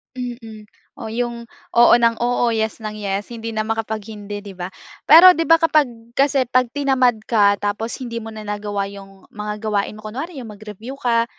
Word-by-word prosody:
Mm, 230 -4 -8 0.2
o 220 - -8
'yung, 235 0 -4 0.2
oo 240 0 +6
ng 230 -1 +3
oo, 240 -1 +1
yes 220 0 -1
ng 215 -2 -6
yes, 205 +2 -4
hindi 230 0 -6
na 215 -1 -2
makapag-hindi, 215 -2 -5
'di 200 - -8
ba? 180 0 -6 0.4
Pero 360 +4 +10
'di 330 - -2
ba, 330 - +8
kapag 310 -4 +3 0.2
kasi, 275 0 +2
pag 255 0 +1
tinamad 265 -3 +2
ka, 205 -3 +3
tapos 210 +3 -3
hindi 235 -3 -5
mo 225 - -8
na 215 -1 -9
nagawa 205 -1 -3
'yung, 195 -1 -12
mga 210 0 -4
gawain 210 -1 -2
mo, 215 - -13
kunwari 275 +9 -6
'yung 225 -5 -8
mag-review 215 +4 -9
ka, 230 -1 +2
225 Hz, 185 wpm, -20 LUFS, 210-245 Hz, 0.4 s, Pero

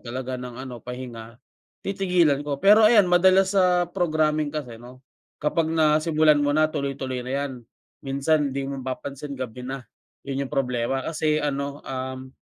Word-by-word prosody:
talaga 130 0 -4
ng 125 -1 -8
ano, 130 -3 -8
pahinga, 120 -2 -8 0.5
titigilan 180 -7 +2
ko. 145 -1 -2
Pero 210 +3 +7
ayan 215 -4 +6
madalas 190 +2 +4
sa 180 -1 +4
programming 155 -4 0
kasi 125 -7 -5
'no, 125 +2 -14 0.4
kapag 160 +2 0
nasimulan 155 -1 +3
mo 145 0 +1
na 155 +1 +3
tuloy-tuloy 135 -4 -3
na 130 - -5
‘yan. 135 - -5 0.5
Minsan 140 +1 +1
‘di 140 0 -3
mo 140 - -4
mapapansin 140 +2 -6
gabi 125 -1 -6
na, 130 0 -6 0.4
yun 140 0 -2
yung - - -10
problema 125 0 0
kasi 155 -1 0
ano, 140 0 -3
um 130 0 -5
140 Hz, 155 wpm, -24 LUFS, 130-155 Hz, 0.5 s, Pero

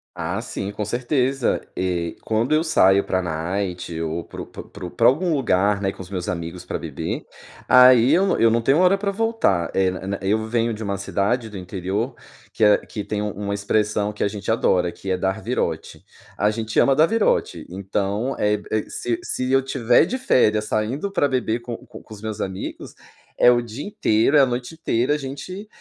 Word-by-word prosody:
Ah, - - -3
sim 100 - -5
com 105 +1 -4
certeza. 125 +3 0
Eh, 90 -2 -2
quando 115 +6 0
eu 155 - +2
saio 100 - +4
pra 95 - 0
night 90 0 -3
ou 80 +1 -3
pro - - -9
pro - - -9
pro 90 -4 -8
pra 115 - +1
algum 165 +7 +2
lugar, 100 -6 +2
né, 95 -1 -1
com 95 - -11
os 90 - -10
meus 90 -3 -4
amigos 85 +1 -5
pra - - -4
beber, - - -4 0.4
aí 125 +1 +7
eu 185 +4 +4
não 195 - +1
eu 115 - +5
não 115 - +2
tenho 135 +7 +3
hora 185 +2 +5
pra 200 0 -1
voltar. 200 - +1
Eh, 95 -1 +3
na 95 +2 -4
eu 105 +3 +1
venho 115 0 0
de 110 - -8
uma 100 -1 -2
cidade 105 +4 -1
do 105 - -8
interior 95 +6 -3 0.4
que - - -1
a 105 -1 +6
que 105 - -7
tem 105 +1 -3
um 105 0 -2
uma 100 +1 -4
expressão 105 0 0
que 105 - -3
a - - +2
gente 100 0 -6
adora 90 -6 +2
que 95 - -6
é 95 - +1
"dar 95 +3 -1
virote". 85 -10 -3 0.3
A 105 - +2
gente 110 0 -1
ama 135 -1 +4
dar 155 - +6
virote. 225 +4 0
Então, 100 +6 -2
é 105 0 +2 0.2
é 110 -1 +1
se 120 -1 -2
se 130 0 -2
eu 135 - +5
estiver 130 0 +3
de 245 +9 -3
férias 110 - +2
saindo 125 - -2
pra 145 - +2
beber 125 -3 -1
com 120 -1 -6
com 125 - -12
com 110 - -13
os 105 - -11
meus 110 -1 -4
amigos, 95 0 -6 0.4
é 125 - +7
o 120 - +3
dia 120 +4 -7
inteiro, 140 - +2
é - - +7
a 135 - +7
noite 125 +4 -4
inteira, 140 -4 0
a - - +1
gente 150 +9 -7
110 Hz, 210 wpm, -22 LUFS, 95-130 Hz, 0.4 s, aí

